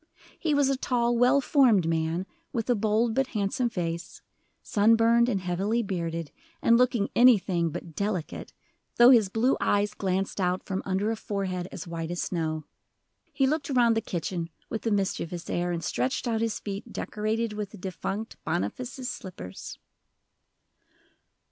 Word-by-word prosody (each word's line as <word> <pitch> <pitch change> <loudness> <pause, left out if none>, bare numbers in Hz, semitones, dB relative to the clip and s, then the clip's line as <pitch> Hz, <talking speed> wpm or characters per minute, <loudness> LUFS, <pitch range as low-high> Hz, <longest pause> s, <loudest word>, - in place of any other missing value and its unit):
He 310 -3 +1
was 285 -1 +3
a 275 - +2
tall, 240 -2 +1
well 250 +4 +4
formed 240 - +4
man, 165 +2 0 0.3
with 235 -1 -1
a - - +6
bold 220 +2 +1
but 270 +2 +1
handsome 225 +5 0
face, 170 -4 -4 0.4
sun 215 +2 +4
burned 235 +1 +4
and 200 -5 0
heavily 195 +6 0
bearded, 165 -5 -3 0.3
and 230 - +4
looking 240 -4 +2
anything 190 -9 +4
but 165 +1 -7
"delicate," 195 -3 -3 0.4
though 240 +2 +8
his 220 -6 +5
blue 230 +6 +2
eyes 205 0 +1
glanced 195 0 -1
out 180 0 0
from 190 -1 -2
under 195 +3 0
a - - -1
forehead 190 -4 -3
as 190 - -7
white 165 -1 -5
as 175 0 -3
snow. 155 -3 -2 0.7
He 270 - +2
looked 295 +1 0
around 240 -4 +4
the 225 - +1
kitchen 170 -2 -3 0.2
with 225 +1 -3
a - - +1
mischievous 180 -3 -2
air, 175 0 0
and 170 -1 -3
stretched 125 - -1
out 225 -1 0
his 230 -1 -1
feet 200 -1 -6
decorated 215 +1 -2
with 210 -1 -4
the - - -12
defunct 195 +4 -5
Boniface's 250 +10 -3
slippers. 135 - -7
205 Hz, 160 wpm, -27 LUFS, 175-235 Hz, 0.7 s, though